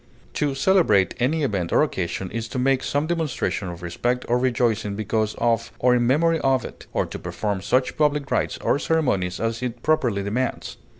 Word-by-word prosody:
To 145 Hz, -2 st, -1 dB
celebrate 135 Hz, -, +3 dB
any 150 Hz, +6 st, +1 dB
event 100 Hz, -10 st, -1 dB
or -, -, +4 dB
occasion 90 Hz, -, -3 dB
is 115 Hz, -1 st, -3 dB
to 130 Hz, -, -6 dB
make 130 Hz, +1 st, +2 dB
some 145 Hz, +2 st, -1 dB
demonstration 160 Hz, -, -2 dB
of 85 Hz, 0 st, -7 dB
respect 120 Hz, +9 st, -1 dB
or 120 Hz, +1 st, +2 dB
rejoicing 120 Hz, -5 st, 0 dB
because 110 Hz, +1 st, -1 dB
of 115 Hz, -1 st, 0 dB
or 125 Hz, 0 st, +3 dB
in 120 Hz, -1 st, +2 dB
memory 165 Hz, +5 st, +3 dB
of 135 Hz, -3 st, +1 dB
it, -, -, -10 dB
or -, -, 0 dB
to -, -, -7 dB
perform 100 Hz, -3 st, -3 dB
such 130 Hz, +6 st, 0 dB
public 150 Hz, -2 st, +1 dB
rites -, -, 0 dB
or -, -, +2 dB
ceremonies 100 Hz, -, 0 dB
as 115 Hz, +1 st, -2 dB
it 120 Hz, -1 st, -4 dB
properly 125 Hz, -10 st, +1 dB
demands. 115 Hz, +6 st, -3 dB
125 Hz, 185 wpm, -23 LUFS, 105-140 Hz, -, or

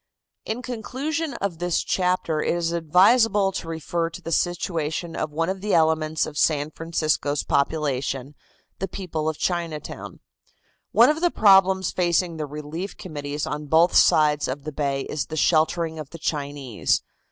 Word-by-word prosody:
In 235 Hz, +3 st, -4 dB
conclusion 275 Hz, +7 st, -3 dB
of 180 Hz, -5 st, -3 dB
this 175 Hz, -1 st, 0 dB
chapter 180 Hz, -4 st, 0 dB
it -, -, 0 dB
is 170 Hz, -1 st, -1 dB
advisable 195 Hz, +5 st, +4 dB
to 175 Hz, -3 st, -5 dB
refer 165 Hz, +1 st, -2 dB
to 165 Hz, -, -9 dB
the 165 Hz, -, -7 dB
situation 165 Hz, -1 st, -1 dB
of 155 Hz, -, -2 dB
one 165 Hz, +3 st, -1 dB
of 190 Hz, 0 st, -3 dB
the 205 Hz, -2 st, +1 dB
elements 160 Hz, -1 st, +2 dB
of 150 Hz, -, -5 dB
San 150 Hz, -1 st, +1 dB
Francisco's 155 Hz, -3 st, -1 dB
population, 140 Hz, -2 st, -1 dB, 0.5 s
the 195 Hz, -, -2 dB
people 165 Hz, -5 st, -3 dB
of 155 Hz, -, -4 dB
Chinatown. 170 Hz, -4 st, -4 dB, 0.7 s
One -, -, +6 dB
of 310 Hz, +2 st, -4 dB
the 350 Hz, -, +4 dB
problems 190 Hz, -, +4 dB
facing 175 Hz, -1 st, 0 dB
the 155 Hz, -1 st, -3 dB
relief 150 Hz, +6 st, -6 dB
committees 145 Hz, -3 st, -5 dB
on 150 Hz, 0 st, -5 dB
both 165 Hz, +4 st, +4 dB
sides 150 Hz, -1 st, +4 dB
of 135 Hz, +2 st, -4 dB
the 155 Hz, -, -5 dB
bay 140 Hz, -2 st, -1 dB
is 145 Hz, +1 st, -4 dB
the 155 Hz, -, -6 dB
sheltering 160 Hz, +1 st, +1 dB
of 150 Hz, -3 st, -7 dB
the 165 Hz, -, -9 dB
Chinese. 145 Hz, -7 st, -1 dB
165 Hz, 160 wpm, -24 LUFS, 150-180 Hz, 0.7 s, One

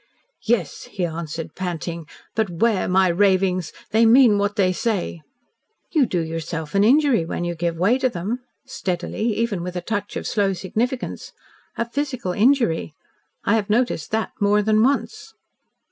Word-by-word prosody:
"Yes," 215 Hz, -9 st, 0 dB
he 185 Hz, -, -2 dB
answered, 165 Hz, -1 st, -5 dB
panting, 170 Hz, -2 st, -4 dB, 0.3 s
"but 220 Hz, -3 st, 0 dB
'ware 195 Hz, +4 st, +1 dB
my 185 Hz, +1 st, +4 dB
ravings! 185 Hz, -2 st, +2 dB, 0.2 s
They 225 Hz, +2 st, +4 dB
mean 230 Hz, -2 st, +6 dB
what 205 Hz, 0 st, 0 dB
they 185 Hz, -2 st, +2 dB
say." 185 Hz, -5 st, -2 dB, 0.7 s
"You 295 Hz, -7 st, +3 dB
do 180 Hz, -4 st, 0 dB
yourself 160 Hz, -1 st, -4 dB
an 200 Hz, 0 st, +4 dB
injury 265 Hz, -, +4 dB
when 165 Hz, +1 st, -4 dB
you 175 Hz, 0 st, -2 dB
give 170 Hz, 0 st, -2 dB
way 205 Hz, +9 st, +3 dB
to 260 Hz, -, +2 dB
them" 205 Hz, +4 st, -3 dB, 0.3 s
steadily, 210 Hz, 0 st, -2 dB
even 220 Hz, -5 st, -1 dB
with 180 Hz, +1 st, -5 dB
a -, -, -1 dB
touch 205 Hz, +2 st, -3 dB
of -, -, -4 dB
slow 200 Hz, -2 st, +1 dB
significance 230 Hz, +7 st, -3 dB, 0.4 s
"a 235 Hz, -, -1 dB
physical 255 Hz, -6 st, -3 dB
injury. 205 Hz, -, +2 dB, 0.5 s
I 205 Hz, -, +2 dB
have 215 Hz, -2 st, 0 dB
noticed 220 Hz, -8 st, 0 dB
that 220 Hz, 0 st, -1 dB
more 205 Hz, 0 st, +3 dB
than 215 Hz, +1 st, +3 dB
once." 280 Hz, -, -1 dB
200 Hz, 160 wpm, -22 LUFS, 175-230 Hz, 0.7 s, mean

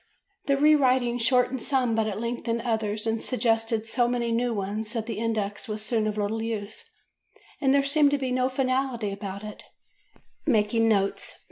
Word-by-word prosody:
The 275 Hz, -1 st, +3 dB
re 300 Hz, +2 st, +6 dB
writing 255 Hz, -4 st, +2 dB
shortened 250 Hz, +2 st, +2 dB
some 255 Hz, -4 st, +1 dB
but 220 Hz, -1 st, +1 dB
it 205 Hz, -, -3 dB
lengthened 235 Hz, 0 st, -2 dB
others 220 Hz, -2 st, -1 dB
and 225 Hz, 0 st, -1 dB
suggested 225 Hz, -3 st, 0 dB
so 240 Hz, +2 st, +1 dB
many 240 Hz, -1 st, -1 dB
new 240 Hz, +1 st, +1 dB
ones 210 Hz, +1 st, -3 dB
that 225 Hz, -2 st, -2 dB
the 225 Hz, -2 st, -4 dB
index 215 Hz, -3 st, -2 dB
was 215 Hz, -1 st, -4 dB
soon 220 Hz, -1 st, 0 dB
of 215 Hz, 0 st, -3 dB
little 210 Hz, +2 st, -1 dB
use 220 Hz, -2 st, -4 dB, 0.8 s
and 270 Hz, -3 st, +3 dB
there 280 Hz, 0 st, +4 dB
seemed 285 Hz, +1 st, +4 dB
to 285 Hz, -, +1 dB
be 260 Hz, -2 st, -3 dB
no 255 Hz, 0 st, +1 dB
finality 255 Hz, -4 st, -1 dB
about 200 Hz, 0 st, -6 dB
it 210 Hz, -1 st, -8 dB, 0.9 s
("Making 225 Hz, -2 st, +3 dB
Notes," 200 Hz, -2 st, 0 dB
pp. -, -, -24 dB
230 Hz, 180 wpm, -26 LUFS, 215-255 Hz, 0.9 s, re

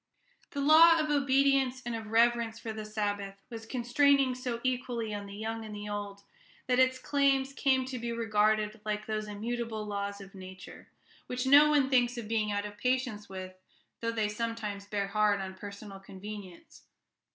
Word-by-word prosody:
The 285 Hz, -, -4 dB
law 325 Hz, +3 st, +7 dB
of 305 Hz, -1 st, 0 dB
obedience 275 Hz, -2 st, +2 dB
and 240 Hz, -1 st, -3 dB
of 225 Hz, -1 st, -6 dB
reverence 230 Hz, 0 st, +2 dB
for 225 Hz, -1 st, -6 dB
the 215 Hz, 0 st, -6 dB
Sabbath 205 Hz, -2 st, -3 dB
was 225 Hz, -1 st, -8 dB
constraining 265 Hz, +2 st, +3 dB
so 250 Hz, -2 st, -4 dB
equally 245 Hz, -3 st, -2 dB
on 205 Hz, -1 st, -5 dB
the 200 Hz, -, -9 dB
young 225 Hz, +2 st, -4 dB
and 215 Hz, -1 st, -8 dB
the 205 Hz, 0 st, -6 dB
old, 205 Hz, -1 st, -5 dB, 0.4 s
that 250 Hz, 0 st, +2 dB
its 260 Hz, 0 st, +4 dB
claims 275 Hz, -1 st, +1 dB
came 265 Hz, -1 st, +2 dB
to 255 Hz, -1 st, -5 dB
be 235 Hz, 0 st, -3 dB
regarded 215 Hz, -1 st, +1 dB
like 215 Hz, 0 st, -3 dB
those 215 Hz, -1 st, -3 dB
immutable 220 Hz, +1 st, -4 dB
laws 200 Hz, -1 st, -4 dB
of 195 Hz, -1 st, -12 dB
nature, 185 Hz, -1 st, -11 dB, 0.4 s
which 250 Hz, +1 st, -3 dB
no 290 Hz, +3 st, +7 dB
one 290 Hz, -3 st, +3 dB
thinks 245 Hz, -1 st, +3 dB
of 230 Hz, -3 st, -5 dB
being 215 Hz, -1 st, 0 dB
out 205 Hz, 0 st, -1 dB
of 205 Hz, 0 st, -9 dB
patience 250 Hz, -5 st, -1 dB
with, 185 Hz, -1 st, -7 dB, 0.5 s
though 230 Hz, 0 st, -1 dB
they 220 Hz, -2 st, 0 dB
sometimes 210 Hz, -2 st, -4 dB
bear 205 Hz, -1 st, -1 dB
hard 210 Hz, 0 st, +2 dB
on 190 Hz, -1 st, -5 dB
personal 200 Hz, +1 st, -9 dB
convenience. 195 Hz, -, -10 dB
225 Hz, 175 wpm, -30 LUFS, 205-255 Hz, 0.5 s, law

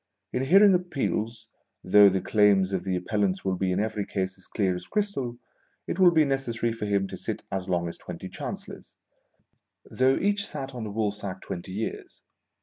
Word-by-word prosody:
In 125 Hz, -, 0 dB
hearing 195 Hz, +6 st, +7 dB
Appeals, 120 Hz, -11 st, -2 dB, 0.4 s
though 100 Hz, +2 st, +7 dB
the 95 Hz, -1 st, 0 dB
claims 100 Hz, -3 st, +3 dB
of 95 Hz, -, -1 dB
the 95 Hz, -1 st, 0 dB
Appellants 95 Hz, +1 st, -1 dB
will 95 Hz, -1 st, +1 dB
be 95 Hz, 0 st, 0 dB
in 90 Hz, -, 0 dB
every 105 Hz, -1 st, -1 dB
case 95 Hz, -2 st, -3 dB
as 95 Hz, -, -16 dB
clear 95 Hz, -4 st, 0 dB
as 90 Hz, -, -8 dB
crystal, 195 Hz, -, -2 dB, 0.5 s
it 180 Hz, -, -4 dB
will 185 Hz, -2 st, +8 dB
be 160 Hz, -3 st, +4 dB
necessary 120 Hz, -4 st, -1 dB
for 110 Hz, -2 st, -4 dB
him 100 Hz, -1 st, +1 dB
to -, -, -6 dB
sit -, -, -5 dB
as 95 Hz, 0 st, -3 dB
long 85 Hz, -1 st, 0 dB
as 85 Hz, -, -7 dB
twenty -, -, -7 dB
Chancellors, -, -, -8 dB, 0.9 s
though 130 Hz, +1 st, +2 dB
each 200 Hz, 0 st, 0 dB
sat 135 Hz, 0 st, -6 dB
on 120 Hz, -3 st, -5 dB
the 105 Hz, -, -5 dB
woolsack 100 Hz, -3 st, -3 dB
twenty 90 Hz, +1 st, -6 dB
years. 110 Hz, +3 st, -5 dB
105 Hz, 185 wpm, -27 LUFS, 95-135 Hz, 0.9 s, will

